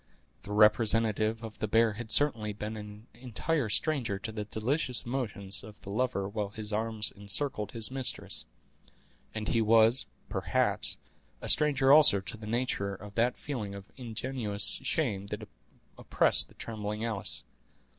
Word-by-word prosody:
The 100 - -10
representative 110 +1 +3
of 110 -1 -9
the 110 - -1
bear 115 +1 +3
had 110 +1 -8
certainly 115 -8 +2
been 105 +2 -6
an 105 0 -10
entire 125 +3 -2
stranger 125 -4 0
to 110 +4 -6
the 105 -1 -5
delicious 125 +4 -2
emotions 110 -6 -1
of 105 0 -12
the 100 - -8
lover 110 -3 -1
while 105 0 -3
his 105 0 -6
arms 110 0 0
encircled 105 +2 +1
his 115 0 0
mistress; 130 -1 0 0.9
and 110 -1 -4
he 115 - +2
was, 115 +2 +4 0.2
perhaps, - - 0 0.4
a - - -7
stranger 140 -3 +5
also 145 -10 +7
to 95 - -5
the 110 0 -10
nature 110 -4 -1
of 100 +2 -11
that 120 +3 +1
feeling 110 -9 -5
of 100 0 -11
ingenuous 115 -4 0
shame 105 -11 -1
that 105 +1 -6 0.5
oppressed - - +2
the - - -21
trembling 105 -1 -5
Alice. 95 -9 -2
110 Hz, 150 wpm, -30 LUFS, 105-120 Hz, 0.9 s, also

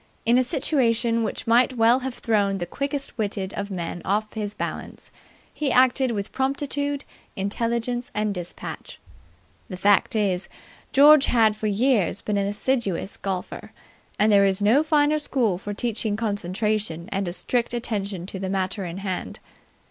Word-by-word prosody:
In 235 +2 +5
a - - +3
situation 235 -3 +1
which 215 - -4
might 240 +2 +3
well 230 +3 +5
have 260 -1 -5
thrown 205 -4 +1
the 175 - -3
quickest 280 - -4
witted 200 -2 -2
of 200 0 -4
men 175 -2 -4
off 210 +2 -1
his 210 -2 -4
balance, - - -6 0.4
he 290 -3 -1
acted 255 +1 +4
with 205 -3 -3
promptitude, 280 +1 -2 0.3
intelligence 235 +4 -2
and 210 0 0
despatch. 175 -2 -7 0.7
The 185 - -6
fact 205 +3 +3
is, 190 -3 +1 0.4
George 290 +1 +7
had 220 -3 +3
for 215 0 -3
years 210 -3 +1
been 210 -1 -1
an 200 0 0
assiduous 205 -3 -1
golfer; 190 -2 -5 0.4
and 215 +1 +4
there 200 -1 +6
is 195 0 +2
no 215 +8 +4
finer 305 -1 +2
school 235 -11 0
for 205 - -6
teaching 220 0 -2
concentration 205 -4 -2
and 195 -1 -1
a - - -2
strict 240 +6 0
attention 205 -6 -3
to 190 0 -7
the 190 0 -3
matter 190 +1 -1
in 175 0 -5
hand. 190 -2 -4
215 Hz, 155 wpm, -24 LUFS, 195-245 Hz, 0.7 s, George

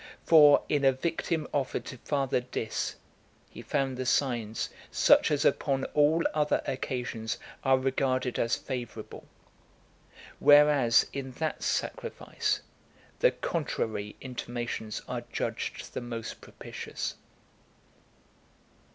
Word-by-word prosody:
For, 150 -3 +7
in 145 -2 +1
a 135 -1 +5
victim 160 +2 -2
offered 140 -3 -1
to 130 - -7
Father 135 -2 0
Dis, 120 -3 -3 0.6
he - - -9
found 135 -2 -1
the 130 - -3
signs 120 -5 0 0.2
such - - +5
as 145 0 +1
upon 135 -2 +2
all 150 +3 +4
other 150 -1 +1
occasions 125 -4 -3 0.3
are 135 0 +4
regarded 130 -1 0
as 115 - +2
favourable; 120 -5 -7 1.1
whereas, 145 -5 +6
in 135 -2 -5
that 155 +4 -3
sacrifice, 430 -2 -2 0.6
the - - +6
contrary 110 - -3
intimations 120 -3 -5
are - - -3
judged - - -4
the - - -3
most 115 -2 -6
propitious. - - -6
135 Hz, 110 wpm, -29 LUFS, 120-150 Hz, 1.1 s, For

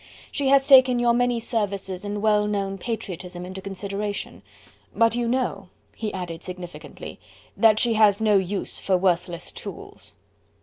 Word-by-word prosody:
She 280 -2 -1
has 270 0 +5
taken 260 -3 +7
your 240 0 +3
many 245 0 +1
services 200 -5 -3
and 205 0 -4
well 210 -1 +3
known 195 -2 -2
patriotism 180 -5 -5
into 185 +1 -7
consideration. 200 +1 -5 0.5
But 230 0 +3
you 240 -1 -1
know," 230 -6 -1 0.3
he 215 -2 -3
added 175 -3 -6
significantly, 180 -1 -9 0.4
"that 220 -2 +5
she 235 +1 +2
has 215 -2 +4
no 215 -2 +3
use 195 +1 -1
for 190 -1 +1
worthless 175 -2 -1
tools." - - -9
205 Hz, 145 wpm, -24 LUFS, 190-230 Hz, 0.5 s, taken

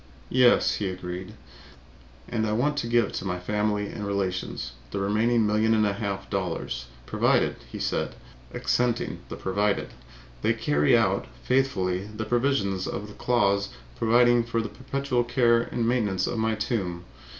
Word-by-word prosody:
"Yes," 125 -1 +5
he 100 -2 -1
agreed. 90 0 -6 0.9
"And 110 -2 -1
I 105 - 0
want 145 +7 +1
to 120 - -1
give 115 -3 +1
my 90 -2 -2
family 105 +2 0
and 105 +1 -6
relations 95 -10 -2 0.2
the - - -4
remaining 110 +3 +2
million 110 +2 +3
and 110 -1 +3
a 100 - +1
half 100 -1 -4
dollars, 90 -10 -3 0.2
provided," - - +2
he - - -6
said, - - -2 0.4
accenting 120 -1 0
the - - -5
'provided,' 100 +2 -1 0.5
"they 110 - +3
carry 135 +1 +3
out 100 -4 +1 0.2
faithfully 100 -9 +1
the 110 +1 -5
provisions 110 -6 +1
of 105 +1 -4
the - - -10
clause 100 -5 +1 0.3
providing 120 - +4
for 115 0 -1
the 110 - -2
perpetual 135 -1 -1
care 120 -1 +3
and 120 -1 -2
maintenance 105 -6 +1
of 115 - -2
my 110 0 +1
tomb. 95 -6 -2
110 Hz, 150 wpm, -26 LUFS, 100-120 Hz, 0.9 s, Yes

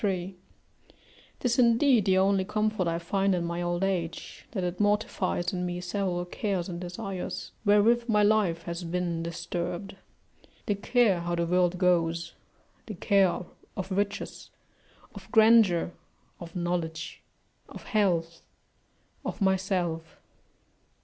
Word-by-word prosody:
653.] 185 -2 -2 1.0
'Tis 250 0 +1
indeed 235 -1 +4
the 190 -1 +3
only 195 0 +3
comfort 215 -1 0
I 165 0 0
find 195 +3 +1
in 175 -1 -1
my 170 +1 -3
old 175 +1 -1
age, 180 -4 -3
that 190 -5 -3
it 180 0 -3
mortifies 205 -4 0
in 180 -1 -2
me 175 0 -3
several 180 -1 -2
cares 185 -1 -2
and 175 -2 -6
desires 185 0 -5
wherewith 230 +4 +4
my 210 -1 +4
life 205 -6 +2
has 170 +1 -5
been 170 -1 -2
disturbed; 170 +3 -4 0.7
the 210 - +1
care 205 -1 +2
how 175 0 -2
the 170 0 0
world 180 +1 +2
goes, 170 -2 +1 0.5
the 215 - -6
care 195 0 +2 0.4
of 190 +1 -4
riches, 200 +1 -3 0.6
of - - -12
grandeur, 220 -7 +5 0.5
of 170 0 -10
knowledge, 170 -2 -3 0.5
of - - -10
health, 175 -7 0 0.8
of - - -5
myself. 185 -4 -1
185 Hz, 130 wpm, -28 LUFS, 175-205 Hz, 1.0 s, grandeur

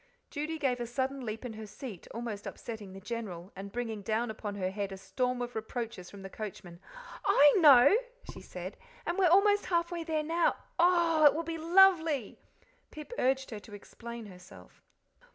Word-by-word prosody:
Judy 305 +2 -3
gave 265 -5 0
a 240 - -3
sudden 265 +2 -2
leap 225 +1 -5
in 240 - -5
her 215 0 -8
seat, 210 -3 -9
almost 225 -3 -5
upsetting 220 -4 -7
the 195 - -9
General, 195 -4 -6
and 195 +1 -8
bringing 225 -3 -4
down 220 +3 -1
upon 210 -1 -6
her 185 -2 -2
head 200 0 -3
a 195 - -6
storm 250 +5 -2
of 245 0 -6
reproaches 220 -4 -5
from 200 -1 -11
the - - -6
coachman. 185 -5 -8 0.4
"I 290 0 +6
know!" 285 +1 +8 0.4
she - - -10
said; - - -8 0.3
"and 345 +3 -1
we're 375 - +5
almost 405 +3 +4
halfway 340 -1 0
there 315 -2 -1
now. 330 +2 +1 0.2
Oh 340 -2 +4
h - - +7
h! - - +12
it 290 - +4
will 330 - -1
be 330 0 -5
lovely." 330 - +4 0.5
Pip 305 +10 -9
urged 265 0 +1
her 215 - -5
to 205 0 -12
explain 235 +3 -9
herself. 180 - -14
245 Hz, 190 wpm, -31 LUFS, 210-315 Hz, 0.5 s, h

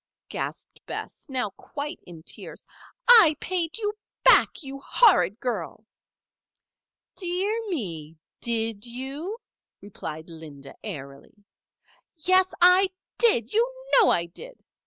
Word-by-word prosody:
gasped - - -6
Bess, - - -7
now 250 -6 -2
quite 295 - -7
in 165 -3 -11
tears. - - -8 0.4
"I 440 -11 +8
paid 345 -2 -2
you 420 -2 -2 0.3
back 395 - +5
you 275 0 -7
horrid 230 - +4
girl!" 215 -3 -4 1.3
"Dear 370 +3 -1 0.2
me! 165 - -4 0.2
did 225 -3 0
you?" 270 - -5 0.4
responded 165 -5 -8
Linda, 150 -4 -10
airily. 140 -8 -8 0.8
"Yes, 370 +3 +3
I 365 +2 +6 0.3
did! 265 - +3
You 470 +3 +2 0.2
know 475 -5 +6
I 170 - +2
did!" - - -10
265 Hz, 110 wpm, -25 LUFS, -, 1.3 s, I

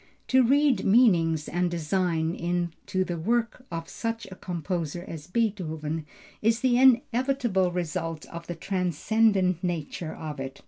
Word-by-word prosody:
To 260 0 +5
read 275 +2 +3
meanings 170 -9 +4
and 175 0 0
design 170 -1 0
into 175 +2 -2
the 175 -2 -4
work 235 +6 -1
of 165 -1 -5
such 230 0 -4
a - - -7
composer 175 -1 -4
as 160 -1 -8
Beethoven 165 -8 -2 0.3
is 225 +2 +2
the 255 -2 +3
inevitable 250 -6 +3
result 165 -2 -3
of 170 0 -9
the 175 - -4
transcendent 185 +1 +1
nature 170 -2 -3
of 150 -3 -6
it. 135 0 -6
180 Hz, 135 wpm, -27 LUFS, 165-225 Hz, 0.3 s, To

